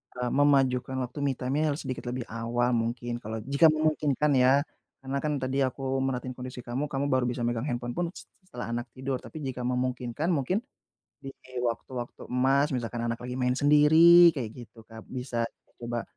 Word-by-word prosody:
eee, 125 0 -2
memajukan 135 -2 +3
waktu 125 +3 -8
me 140 -2 0
time-nya 140 +5 0
harus - - -7
sedikit 130 -1 -5
lebih 125 0 -3
awal, 120 +2 0
mungkin, 120 +1 -2
kalau 110 -1 -6
jika 140 +6 +5
memungkinkan 150 -2 +2
ya, 135 +3 +5 0.4
karena 135 +1 -2
kan 150 - 0
tadi 130 +1 -1
aku 135 +1 -2
merhatiin 130 -1 -2
kondisi 125 -1 -7
kamu, 130 +5 -3
kamu 140 0 -2
baru 130 -1 +2
bisa 120 0 -2
megang 120 +3 -1
handphone 120 -1 -3
pun 175 - +1
s - - -9 0.2
setelah 120 -6 -6
anak 120 +1 -3
tidur, 130 0 -3
tapi 155 -2 -9
jika 130 -2 -4
memungkinkan, 125 +5 -1
mungkin 175 - 0 0.6
di 135 - -6 0.3
waktu-waktu 120 +1 -4
emas, 135 +3 +2
misalkan 120 -1 -3
anak 115 0 -2
lagi 125 0 -5
main 125 0 +1
sendiri 160 +5 +7
kek 120 -6 -4
gitu, 115 -1 -12
Kak, 110 0 -13
bisa 125 -2 -3 0.3
coba, 120 -1 -3
130 Hz, 180 wpm, -28 LUFS, 120-140 Hz, 0.6 s, sendiri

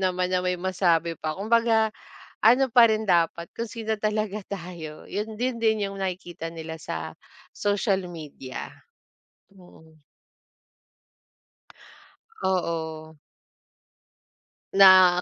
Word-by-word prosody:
naman 185 -1 0
na 185 - +2
may 180 0 0
masabi 175 -3 +1
pa, 155 0 -3
kumbaga 220 +1 +2 0.5
ano 250 +4 +5
pa 235 -1 +7
rin 215 0 -1
dapat 170 -1 +2
kung 230 - -3
sino 220 -1 -3
talaga 215 -1 -1
tayo 170 -5 -8
yun 215 +2 -4
din 250 0 0
din 220 -3 +2
yung 195 - -8
nakikita 175 -3 -5
nila 160 -1 -7
sa - - -5 0.4
social 205 -1 0
media. 145 -5 -8 0.8
Mm. 160 -4 -19 2.4
Oo. 160 -4 -2 1.6
Na 185 -2 +7
185 Hz, 105 wpm, -25 LUFS, 170-215 Hz, 2.4 s, pa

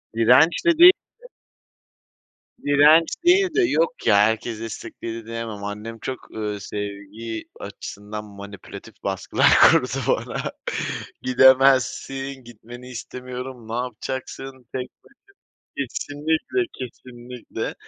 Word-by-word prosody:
Direnç 125 - +4
de 340 -2 +4
değildi. 355 +2 +10 1.7
Direnç 150 +3 +6 0.2
değil 375 +2 +5
de, 410 - +4
yok - - +1
ya, - - +6
herkes 110 +1 +1
destekledi 115 0 -7
diyemem. 115 -2 -6
Annem 105 +3 -6
çok, 130 +2 -7
ııı, 105 -2 -3
sevgi 105 +3 -6 0.2
açısından 105 +1 -8
manipülatif 100 0 -11
baskılar - - +1
kurdu - - +6 0.2
bana. - - -1 0.7
"Gidemezsin, 130 +1 +3
gitmeni 120 +2 -12
istemiyorum. 125 -1 -8
Ne 110 - -6
yapacaksın 130 +2 -5 0.2
tek 130 -1 -4
başına." - - -27 0.7
Kesinlikle, 150 - -1
kesinlikle. 125 -1 -7
125 Hz, 95 wpm, -23 LUFS, 110-135 Hz, 1.7 s, değildi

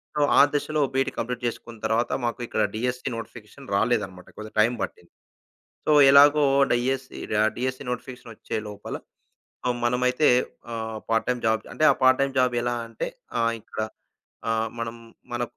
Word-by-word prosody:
So, 150 - +1 0.2
ఆ - - +10
దశలో 150 +1 0
B Ed 135 0 +1
complete 125 +1 -3
చేసుకున్న 115 0 -6
తరువాత 115 +2 +1
మాకు 120 +1 -2
ఇక్కడ 110 - 0
డీఎస్‌సీ 125 +2 -2
నోటిఫికేషన్ 115 +3 -10
రాలేదన్నమాట. 95 -5 0
కొద్దిగా 110 0 -9
టైం 115 +3 +3
పట్టింది. - - -8 0.8
సో, - - +2 0.2
ఎలాగో 145 +1 +7 0.3
డీఎస్‌సీ 130 +2 -1 0.2
ఆహ్, 110 - +3
డీఎస్‌సీ 130 +2 -2
నోటిఫికేషన్ 125 -1 -6
ఒచ్చే - - -5
లోపల 105 0 -6 0.7
ఆహ్, 125 -1 +1
మనమైతే 125 +4 +2 0.5
ఆహ్, 110 -1 -4
పార్ట్ 115 0 +2
టైమ్ 125 -1 0
జాబ్ 110 0 0
అంటే 155 - -1
ఆ - - +3
పార్ట్ 130 0 +6
టైమ్ 140 0 +1
జాబ్ 125 -1 +3
ఎలా 120 0 0
అంటే 115 - -4 0.3
ఆహ్, 115 0 +2
ఇక్కడ - - -10 0.7
ఆహ్, 115 0 +1
మనం 115 0 -3 0.4
మన 120 - -1
120 Hz, 160 wpm, -25 LUFS, 115-130 Hz, 0.8 s, ఆ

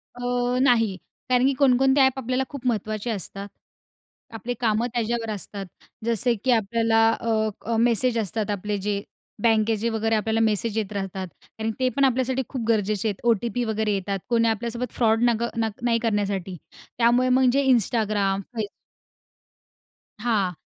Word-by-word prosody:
अ, 245 0 -1
नाही, 225 -6 +3 0.3
कारण 250 0 +3
की 275 - +3
कोणकोणते 270 0 +4
ॲप 265 0 +3
आपल्याला 255 +1 -1
खूप 275 -3 -9
महत्त्वाचे 215 -1 -2
असतात. 200 -1 -5 0.9
आपले 225 +2 -4
कामं 225 0 +1
त्याच्यावर 235 -1 -1
असतात. 200 0 -6 0.4
जसे 235 +1 +2
की 260 - +2
आपल्याला 225 0 +2 0.2
अ, 220 -1 0 0.2
अ, 230 - -1
मेसेज 235 +1 +2
असतात 215 0 -2
आपले, 205 +1 -2
जे 200 0 -2 0.4
बँकेचे 225 0 +2
वगैरे 225 0 0
आपल्याला 220 +1 0
मेसेज 220 0 +1
येत 210 -3 -2
राहतात. 195 -1 -4 0.2
कारण, 220 0 -5
ते 255 -1 +2
पण 280 -1 +4
आपल्यासाठी 260 0 +1
खूप 255 -5 -4
गरजेचे 215 -2 +1
आहेत. 205 -3 -3
ओ-टी-पी 235 +1 +1
वगैरे 220 -1 -1
येतात, 195 0 -2
कोणी 230 -1 +3
आपल्यासोबत 235 +2 -2
फ्रॉड 225 -1 +2
नग 235 0 0
न 225 -1 +1
नाही 235 -1 +2
करण्यासाठी 200 -5 -1 0.4
त्यामुळे 240 +2 +3
म्हणजे 260 +2 +3
Instagram, 210 -4 +1
Facebook 215 -3 -2 1.5
हां. 210 -6 +1
225 Hz, 150 wpm, -24 LUFS, 210-245 Hz, 1.5 s, कोणकोणते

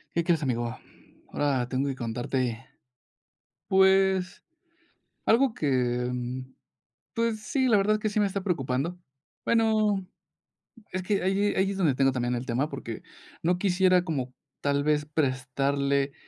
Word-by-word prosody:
¿Qué 170 - +1
crees, 165 -3 +2
amigo?, 120 -3 -2 0.5
ahora 135 -4 0
tengo 135 +2 0
que 135 - -2
contarte, 120 0 -2 1.0
pues, 190 -1 +3 0.9
algo 245 +2 +4
que, 125 - 0
mm, 125 +1 -5 0.6
pues, 230 -2 0
sí, 260 +6 0
la 225 -4 +5
verdad 210 +2 +3
que 215 - -1
sí 210 - -1
me 205 - +3
está 195 0 -3
preocupando, 165 -1 -1 0.4
bueno, 215 -4 +2 0.9
es 185 0 -3
que 200 +2 0
ahí 195 +2 +1
ahí 190 +1 +2
es 195 - -4
donde 165 -8 +3
tengo 135 +1 +3
también 125 -1 -1
el 120 +1 -3
tema, 125 +5 0
porque 135 -6 -7 0.4
no 180 +2 +2
quisiera 185 -1 +3
como 135 -7 -3 0.3
tal 140 0 0
vez 150 0 +1
prestarle, 140 -1 0
150 Hz, 140 wpm, -27 LUFS, 130-195 Hz, 1.0 s, la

